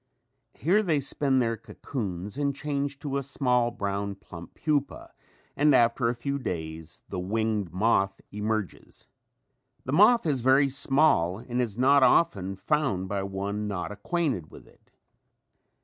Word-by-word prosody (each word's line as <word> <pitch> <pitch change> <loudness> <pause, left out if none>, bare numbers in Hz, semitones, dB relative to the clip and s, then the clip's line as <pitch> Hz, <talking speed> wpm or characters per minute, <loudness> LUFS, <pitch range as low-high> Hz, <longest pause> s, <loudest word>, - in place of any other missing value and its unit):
Here 185 - +2
they 165 -8 +1
spin 135 0 0
their 115 -2 +1
cocoons 100 -4 -6
and 140 -1 -1
change 140 -1 -3
to 140 -2 -2
a - - -1
small, 125 -3 +1
brown, 100 -3 -3
plump 90 -4 -12
pupa 145 -3 -2 0.4
and 145 -1 +4
after 115 0 +3
a 120 - -1
few 140 +4 -3
days 80 - -6
the 95 - -4
winged 105 -1 -1
moth 95 0 +1
emerges. 105 -1 -4 0.8
The 130 - -3
moth 215 +7 +5
is 140 -6 0
very 135 +3 +4
small 135 - +2
and 120 +2 -3
is 115 -4 -3
not 140 +3 +5
often 100 - +3
found 100 -3 -1
by 100 0 -1
one 100 +2 -3
not 95 -3 -4
acquainted 120 - -2
with - - -14
it. - - -25
120 Hz, 145 wpm, -27 LUFS, 100-140 Hz, 0.8 s, moth